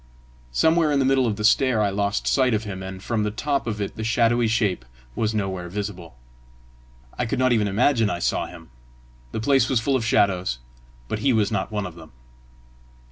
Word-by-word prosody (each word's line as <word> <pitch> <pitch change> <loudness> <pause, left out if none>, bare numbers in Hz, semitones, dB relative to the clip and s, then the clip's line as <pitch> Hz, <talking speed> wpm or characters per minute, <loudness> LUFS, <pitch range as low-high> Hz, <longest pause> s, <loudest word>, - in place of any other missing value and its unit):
Somewhere 160 - +3
in 145 - +2
the 135 - +2
middle 135 -2 +3
of 110 - -1
the 105 - -5
stair 120 +2 +3
I 105 -2 +2
lost 100 +1 -1
sight 130 -4 +3
of 110 - -2
him, 100 -3 -6
and 95 0 -7
from 115 -2 -1
the 105 - 0
top 140 +5 -2
of 105 -2 -3
it 100 - -4
the 110 - -4
shadowy 115 +1 +2
shape 110 - 0 0.3
was 110 0 -1
nowhere 95 -4 -3
visible. 95 - -6 1.0
I 125 - 0
could - - -2
not 130 -1 +3
even 105 -3 +2
imagine 115 +2 +2
I 90 - -2
saw 85 - -1
him. 85 -6 -13 0.6
The - - -3
place 135 +4 +3
was 130 - +2
full 135 +4 0
of 130 - 0
shadows, 95 - +1 0.5
but 105 - -3
he 130 +3 +2
was 105 -3 +1
not - - -2
one 105 -2 -2
of 90 - -7
them. 80 -5 -14
110 Hz, 205 wpm, -23 LUFS, 100-125 Hz, 1.0 s, Somewhere